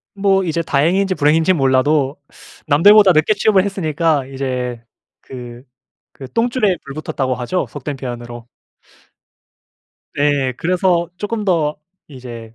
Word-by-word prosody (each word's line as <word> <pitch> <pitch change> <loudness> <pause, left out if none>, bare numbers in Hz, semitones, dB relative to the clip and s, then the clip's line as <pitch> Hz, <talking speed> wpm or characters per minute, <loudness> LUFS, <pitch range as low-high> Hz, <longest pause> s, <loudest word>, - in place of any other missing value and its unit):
뭐 195 -1 +2
이제 165 0 -1
다행인지 180 +7 +1
불행인지 160 +3 +3
몰라도 135 -1 +1 0.5
남들보다 200 +6 +6
늦게 155 +7 +2
취업을 200 -2 +2
했으니까 160 -7 -1
이제 125 -3 -4 0.4
그 120 -1 -10 0.5
그 135 - -10
"똥줄에 230 -5 +1
불 140 -1 -9
붙었다."고 135 -4 -3
하죠 155 +9 -2
속된 145 0 -6
표현으로. 120 -2 -8 1.7
네. 145 -2 +1
그래서 175 -1 0
조금 210 +2 -4
더 160 -5 0 0.3
이제 120 -4 -10
150 Hz, 270 characters per minute, -18 LUFS, 130-185 Hz, 1.7 s, 남들보다